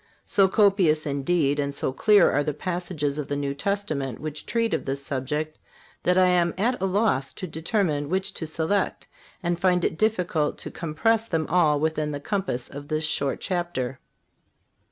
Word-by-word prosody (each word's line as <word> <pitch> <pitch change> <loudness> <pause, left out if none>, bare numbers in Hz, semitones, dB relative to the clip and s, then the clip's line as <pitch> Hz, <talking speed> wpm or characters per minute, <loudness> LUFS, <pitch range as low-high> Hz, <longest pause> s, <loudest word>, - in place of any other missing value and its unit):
So 195 -1 +4
copious, 190 -6 +3
indeed, 145 +1 +1
and 140 0 -1
so 130 - -1
clear 205 +5 +5
are 145 - +2
the 150 -1 -2
passages 170 -4 -2
of 150 - -3
the 145 - -2
New 140 -1 -2
Testament 150 - -2
which 155 -1 -5
treat 230 -1 0
of - - -1
this 140 +1 -2
subject 150 +4 -3 0.4
that 180 +1 +2
I 185 - +6
am 175 -2 +2
at 235 +2 0
a 190 - +2
loss 190 -9 +1
to - - -5
determine 160 -3 -1
which 190 +2 -1
to 160 - -4
select, 165 +5 -1 0.4
and 175 0 0
find 180 -2 +3
it 160 - -2
difficult 180 -8 +1
to - - -7
compress 220 +8 0
them 160 -5 0
all 155 -5 +3
within 155 0 0
the 145 - -3
compass 185 - -2
of 145 +1 -9
this 155 +1 -1
short 140 -2 -1
chapter. 175 -9 -2
160 Hz, 175 wpm, -25 LUFS, 145-190 Hz, 0.4 s, I